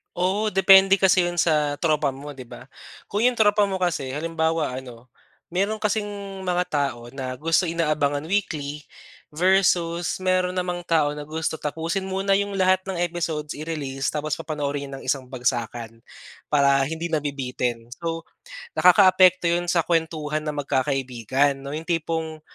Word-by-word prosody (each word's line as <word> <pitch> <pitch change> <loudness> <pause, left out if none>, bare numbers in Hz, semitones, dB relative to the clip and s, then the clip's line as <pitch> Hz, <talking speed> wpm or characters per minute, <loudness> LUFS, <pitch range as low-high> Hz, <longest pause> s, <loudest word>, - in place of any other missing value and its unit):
Oo, 195 +4 0
depende 195 0 +7
kasi 185 -2 +4
'yon 175 -1 0
sa 150 -3 +2
tropa 150 -4 +1
mo, 140 +1 -9
'di 130 - -8
ba? - - -12 0.4
Kung 210 +4 0
'yong 250 - +4
tropa 210 -2 +3
mo 190 -1 -3
kasi 140 -7 -1
halimbawa 160 -3 -1
ano, 125 -1 -11 0.4
meron 200 +5 -1
kasing 210 0 0 0.4
mga 180 0 +1
tao 130 -6 -2
na 130 -1 -5
gusto 165 +6 +1
inaabangan 150 -4 0
weekly 150 -7 -2 0.5
versus 175 0 +2
meron 185 -1 +1
namang 180 -1 -3
tao 150 -3 +1
na 150 - -6
gusto 160 +1 -3
tapusin 165 +6 -3
muna 195 +1 +1
'yong 200 0 -2
lahat 185 -1 +2
ng 190 - -4
episodes 160 -4 -3
i-release 145 -4 -4
tapos 150 0 -2
papanoorin 145 -2 -3
'yon 140 - -10
ng - - -13
isang 135 -2 0
bagsakan, 120 -3 -3 0.5
para 140 -2 +3
hindi 160 +3 -4
nabibitin. 125 -6 -2
So, 165 -1 -3 0.5
nakakaapekto 185 -1 +5
'yon 175 +1 +1
sa 170 -3 +2
kuwentuhan 155 -2 -1
ng 150 -1 -4
magkakaibigan, 135 0 0
'no, 140 - -7
'yong 155 +3 -5
tipong, 160 -2 -2
160 Hz, 150 wpm, -24 LUFS, 140-180 Hz, 0.5 s, depende